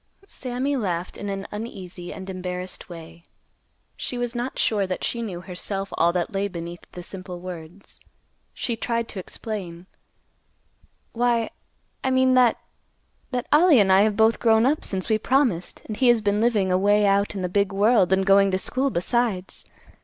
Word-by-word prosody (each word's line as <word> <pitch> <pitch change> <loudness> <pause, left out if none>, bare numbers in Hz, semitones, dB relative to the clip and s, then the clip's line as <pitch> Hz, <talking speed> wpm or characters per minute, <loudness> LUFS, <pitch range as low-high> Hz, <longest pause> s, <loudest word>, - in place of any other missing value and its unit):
Sammy 260 -3 -3
laughed 180 -7 -2
in 205 - -5
an 195 0 -4
uneasy 190 -5 -7
and 190 - -8
embarrassed 185 -1 -5
way. 165 0 -11 0.7
She 250 - -4
was 245 -1 -2
not 245 +2 -4
sure 205 -3 +1
that 185 - -4
she 235 - -1
knew 185 -6 -5
herself 195 +2 -5
all 170 +1 +3
that 180 0 -2
lay 200 +1 0
beneath 170 -2 -8
the 180 - -8
simple 185 -1 -8
words. 175 +1 -10 0.5
She 235 - -3
tried 230 0 -2
to 195 - -6
explain. 185 -3 -6 1.3
"Why, 235 -1 +1 0.5
I 265 - +1
mean 260 0 +3
that—that 250 0 -2
Ollie 310 -3 +6
and 195 -2 +4
I 190 - +6
have 210 0 +2
both 220 +1 +4
grown 225 0 +4
up 295 +4 +1
since 190 -2 -2
we 220 -2 +2
promised, 240 -8 0
and 215 - -5
he 255 +3 +2
has 240 -1 +6
been 205 0 +1
living 215 -5 +2
away 205 +3 +3
out 200 +1 +2
in 190 - -3
the - - 0
big 200 +2 +1
world 200 -1 +3
and 190 0 +3
going 195 0 +5
to 185 - +1
school 260 +8 -1
besides. 200 -1 -1
200 Hz, 170 wpm, -24 LUFS, 185-235 Hz, 1.3 s, Ollie